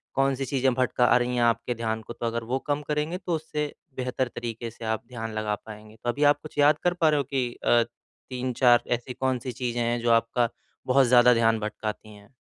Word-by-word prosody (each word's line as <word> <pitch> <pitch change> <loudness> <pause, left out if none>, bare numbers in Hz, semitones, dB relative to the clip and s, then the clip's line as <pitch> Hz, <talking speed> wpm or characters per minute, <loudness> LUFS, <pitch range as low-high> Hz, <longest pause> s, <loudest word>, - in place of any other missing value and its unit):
कौन-सी 135 0 +1
चीजें 135 -2 +1
भटका 125 0 +1
रही 125 0 -1
हैं 120 - +1
आपके 115 +1 +1
ध्यान 110 -1 -2
को - - -9
तो - - -6
अगर 115 0 -2
वो 125 +3 -1
कम 145 0 0
करेंगे 150 +3 -1
तो 180 -2 -2
उससे 150 -2 -3 0.3
बेहतर 130 0 -1
तरीके 115 0 -5
से 115 - -10
आप 110 +1 -1
ध्यान 115 -3 -6
लगा 110 -1 -1
पाएँगे। 110 0 -11
तो 120 - -1
अभी 145 +5 0
आप 145 - -2
कुछ 155 - -12
याद 145 +1 +5
कर 175 0 +2
पा 165 -3 +2
रहे 150 - +2
हो 140 - +1
कि 130 -2 -2
अ, 120 -1 +4 0.5
3-4 125 -1 +3
ऐसी 120 +2 -9
कौन-सी 130 -1 -2
चीजें 120 0 -3
हैं 120 +1 0
जो 120 0 +2
आपका 115 +1 +2 0.4
बहुत 135 +1 +5
ज़्यादा 125 0 +6
ध्यान 115 -1 +3
भटकाती 105 0 -5
हैं? 100 0 -17
120 Hz, 215 wpm, -26 LUFS, 115-135 Hz, 0.5 s, ज़्यादा